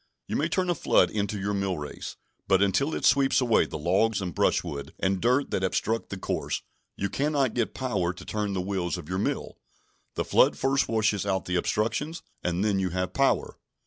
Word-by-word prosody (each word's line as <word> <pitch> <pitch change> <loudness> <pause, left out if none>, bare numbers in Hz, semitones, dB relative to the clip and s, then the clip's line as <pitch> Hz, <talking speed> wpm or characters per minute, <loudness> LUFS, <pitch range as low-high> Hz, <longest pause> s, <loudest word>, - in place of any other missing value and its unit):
You - - -4
may - - +1
turn 185 -1 0
a - - +3
flood 165 - +3
into 105 -1 -2
your 100 +1 -1
millrace, 95 -7 -3 0.3
but 95 +1 +4
until 100 - +1
it - - -2
sweeps 140 0 +4
away 120 -4 +3
the - - -5
logs 95 +7 +2
and 90 -3 -4
brushwood 70 -1 -1
and 95 0 0
dirt 125 +4 +2
that 95 - 0
obstruct 110 +4 -1
the 100 - -5
course, - - -3 0.3
you 100 - 0
cannot 140 +1 0
get 120 -3 -1
power 120 -10 0
to 90 - -11
turn 105 -2 -2
the 95 - -1
wheels 90 -2 -2
of 85 -4 -9
your 95 +1 -2
mill. 105 - -2 0.6
The - - -1
flood - - +4
first 135 +1 +2
washes 110 -3 +1
out 95 -2 -1
the 90 - -2
obstructions, 115 - -1 0.2
and 90 +3 0
then 100 -2 +2
you 95 -1 0
have 90 +1 -2
power. 135 0 +1
100 Hz, 200 wpm, -27 LUFS, 95-120 Hz, 0.6 s, but